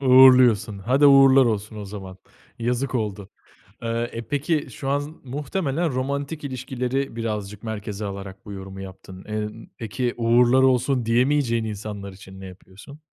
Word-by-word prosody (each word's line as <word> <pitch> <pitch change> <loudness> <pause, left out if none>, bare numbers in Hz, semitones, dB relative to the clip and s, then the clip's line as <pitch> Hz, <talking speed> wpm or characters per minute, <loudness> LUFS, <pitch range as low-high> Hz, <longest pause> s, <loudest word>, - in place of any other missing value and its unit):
Uğurluyorsun. 125 -6 +6
Hadi, 130 +8 +3
uğurlar 135 -1 +7
olsun 110 -2 -2
o 105 - -6
zaman. 95 -2 -9 0.4
Yazık 125 +3 -1
oldu. 105 -4 -3 0.5
Aaa, 115 0 -1
e, 115 -1 -7
peki, 145 +3 -1
şu 135 +4 -5
an 140 +1 +2
z 145 - -5 0.2
muhtemelen 145 +3 -2
romantik 140 +4 -3
ilişkileri 130 -1 -3
birazcık 105 -2 -4
merkeze 105 -1 -5
alarak 100 -1 -7
bu 105 - -8
yorumu 95 0 -8
yaptın. 95 0 -11
Eee, 105 0 -3
ımm, 110 +2 -10
peki, 115 +3 -2
"Uğurlar 120 +2 +4
olsun" 130 -1 +2
diyemeyeceğin 120 0 +2
insanlar 100 -2 -6
için 95 0 -13
ne - - -8
yapıyorsun? 95 +9 -13
115 Hz, 150 wpm, -23 LUFS, 100-135 Hz, 0.5 s, uğurlar